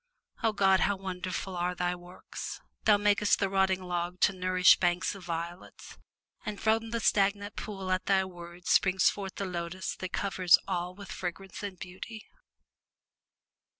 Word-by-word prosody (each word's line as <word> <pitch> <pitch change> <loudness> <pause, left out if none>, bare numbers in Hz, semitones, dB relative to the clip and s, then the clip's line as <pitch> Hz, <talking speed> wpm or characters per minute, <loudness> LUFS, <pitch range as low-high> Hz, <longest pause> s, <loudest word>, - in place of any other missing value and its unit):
O 225 - +3
God! 195 -2 +4
how 200 - +2
wonderful 185 0 -4
are 180 +1 -1
Thy 180 0 0
works! 180 +1 -8 0.3
Thou 210 -1 +6
makest 205 0 +3
the 195 - 0
rotting 190 -1 +2
log 175 0 -3
to 205 - +5
nourish 185 0 +5
banks 175 +2 +1
of 195 -2 -10
violets, 170 +1 -6 0.4
and 210 -1 -5
from 225 +1 +1
the 230 0 -1
stagnant 205 -1 +1
pool 195 -3 -5
at 185 0 0
Thy 190 -1 +3
word 175 -1 -11
springs 190 -1 +4
forth 195 -2 -6
the 200 - -3
lotus 180 0 -4
that 185 - -4
covers 190 -3 +4
all 180 +1 -2
with 200 0 -10
fragrance 185 +1 -6
and 200 -3 -5
beauty! 190 +5 -8
185 Hz, 155 wpm, -30 LUFS, 180-200 Hz, 0.4 s, Thou